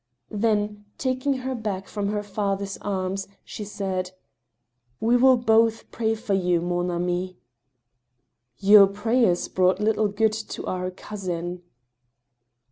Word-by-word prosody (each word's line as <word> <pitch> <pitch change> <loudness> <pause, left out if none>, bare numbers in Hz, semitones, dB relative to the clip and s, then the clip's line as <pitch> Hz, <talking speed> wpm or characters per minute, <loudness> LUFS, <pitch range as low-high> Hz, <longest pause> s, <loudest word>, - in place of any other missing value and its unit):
Then, 210 -1 0
taking 260 +1 0
her 260 - -1
back 210 -5 -4
from 205 -1 -3
her 210 0 -2
father's 200 -1 -2
arms, 195 -1 -3 0.2
she 215 - -7
said: 190 -3 -3 0.5
" 120 +1 -47
We 235 +2 +3
will 255 +1 +6
both 225 -1 +2
pray 225 -1 0
for 215 -2 -3
yt>u, 180 -2 +2
man 175 +1 -1
ami" 180 +1 -2 0.6
" 125 -1 -52
Your 205 -2 +10
prayers 210 -2 +1
brought 185 +1 +2
little 215 0 +2
good 215 +2 +1
to 220 0 -6
our 185 0 -2
cousin." 180 -2 -5
200 Hz, 130 wpm, -24 LUFS, 180-220 Hz, 0.6 s, Your